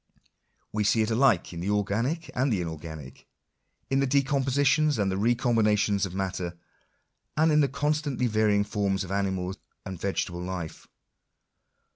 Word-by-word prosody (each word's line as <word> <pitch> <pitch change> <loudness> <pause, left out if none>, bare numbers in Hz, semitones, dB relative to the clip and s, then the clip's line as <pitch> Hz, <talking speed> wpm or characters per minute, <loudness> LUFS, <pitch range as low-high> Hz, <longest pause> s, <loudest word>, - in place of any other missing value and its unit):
We 105 0 0
see 110 +2 +3
it 110 - -2
alike 115 -7 +3
in 85 - -6
the 90 +4 -2
organic 115 - -1
and 130 +2 +1
the 105 - +1
inor 80 -3 -4
ganic 80 -5 -9 0.3
— - - -48
in 135 - +3
the 135 - +2
decompositions 140 +2 +2
and 100 -2 +1
recombinations 105 -2 +2
of 90 - -9
matter, 90 -2 -3 0.8
and 160 +1 +4
in 150 - +4
the 140 -2 +3
constantly 145 -1 -1
varying 110 -2 +2
forms 100 -2 -1
of 95 - -8
animal 95 -2 -1 0.3
and 95 -3 -7
vegetable 90 -3 -2
life. 90 -3 -6
105 Hz, 150 wpm, -27 LUFS, 95-135 Hz, 0.8 s, and